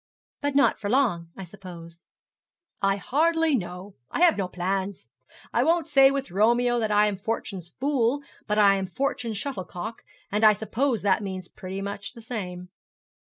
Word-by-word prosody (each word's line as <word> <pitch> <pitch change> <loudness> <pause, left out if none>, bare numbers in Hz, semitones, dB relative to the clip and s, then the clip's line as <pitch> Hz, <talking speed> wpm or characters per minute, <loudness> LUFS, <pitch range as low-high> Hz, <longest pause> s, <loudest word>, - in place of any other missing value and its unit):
'But 285 -1 -1
not 280 - +4
for 205 - -3
long, 215 -10 +1
I 195 - -6
suppose.' 175 -3 -11 0.8
'I 195 0 +3
hardly 320 - +2
know. 180 -1 -5
I - - -3
have 350 -2 +6
no 195 -2 -1
plans. 190 - -3 0.5
I 240 - +3
won't 330 +3 +2
say 275 -3 +6
with 275 -4 -3
Romeo 240 +5 +3
that 220 -2 0
I 210 0 +4
am 205 -2 -1
fortune's 195 -4 -4
fool 275 0 +1 0.2
but 210 0 0
I 200 -2 +6
am 190 -1 -2
fortune's 240 0 -2
shuttlecock; 205 - -5 0.3
and 210 +2 0
I 215 -1 +8
suppose 225 +3 -1
that 200 +1 +3
means 190 -3 -5
pretty 190 0 -7
much 200 +1 -5
the 235 - -12
same.' 180 -6 -5
210 Hz, 170 wpm, -26 LUFS, 190-255 Hz, 0.8 s, I